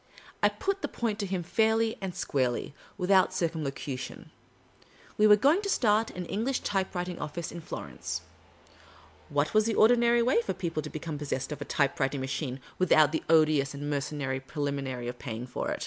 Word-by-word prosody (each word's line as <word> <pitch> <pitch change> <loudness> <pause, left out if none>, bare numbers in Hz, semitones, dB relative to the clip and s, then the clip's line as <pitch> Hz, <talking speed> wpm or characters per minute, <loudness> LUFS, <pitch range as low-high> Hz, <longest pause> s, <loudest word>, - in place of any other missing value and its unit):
I - - +5
put 390 0 -2
the - - -1
point 220 -3 -2
to 200 - -1
him 185 -2 -2
fairly 220 +4 +2
and 190 -2 -4
squarely, 130 -6 -1 0.2
without 185 0 +3
circum 165 -3 -1
locution; 135 -1 -5 0.8
we 215 - +5
were 210 - +9
going 285 - +3
to 400 - -3
start 220 - +3
an 180 -1 -6
English 230 +9 -1
typewrititig 180 -3 -2
office 165 +2 -4
in 170 - -7
Florence; 70 - -5 1.1
what 145 +1 0
was 215 0 +4
the 225 - 0
ordinary 235 +1 +5
way 245 0 +3
for 195 - -2
people 170 -4 -2
to 150 - -7
become 155 -1 -5
possessed 140 -1 -3
of 150 - -5
a - - -3
typewriting 140 -1 0
machine, 135 0 -3 0.2
without 155 -5 +5
the 160 - -1
odious 155 -3 +4
and 145 +1 -4
mercenary 140 -2 -2
preliminary 135 -3 -3
of 125 0 -6
paying 120 -2 -5
for 125 - -4
it - - -2
165 Hz, 180 wpm, -29 LUFS, 140-210 Hz, 1.1 s, were